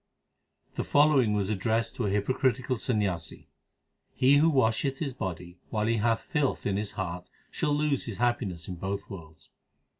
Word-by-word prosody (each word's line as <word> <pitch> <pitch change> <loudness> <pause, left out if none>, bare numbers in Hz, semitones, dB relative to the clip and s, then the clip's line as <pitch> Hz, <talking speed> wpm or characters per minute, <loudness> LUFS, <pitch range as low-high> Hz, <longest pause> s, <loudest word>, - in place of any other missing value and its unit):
The - - 0
following 145 -7 +4
was 105 0 0
addressed 110 +3 0
to 115 - 0
a - - +1
hypocritical 125 +5 0
Sanyasi: 100 -8 -2 0.7
He 135 +2 +5
who 160 +3 +5
washeth 135 -1 +1
his 140 -4 -3
body 90 -3 -6
while 105 -1 -1
he 115 +1 +1
hath 115 +1 +1
filth 150 -4 -1
in 100 - 0
his 105 +1 -2
heart 90 -2 -5 0.2
shall 150 - -1
lose 150 -2 0
his 110 -5 -5
happiness 115 -8 -1
in 90 - -6
both 95 +3 -4
worlds. 80 -4 -11
110 Hz, 160 wpm, -28 LUFS, 95-130 Hz, 0.7 s, He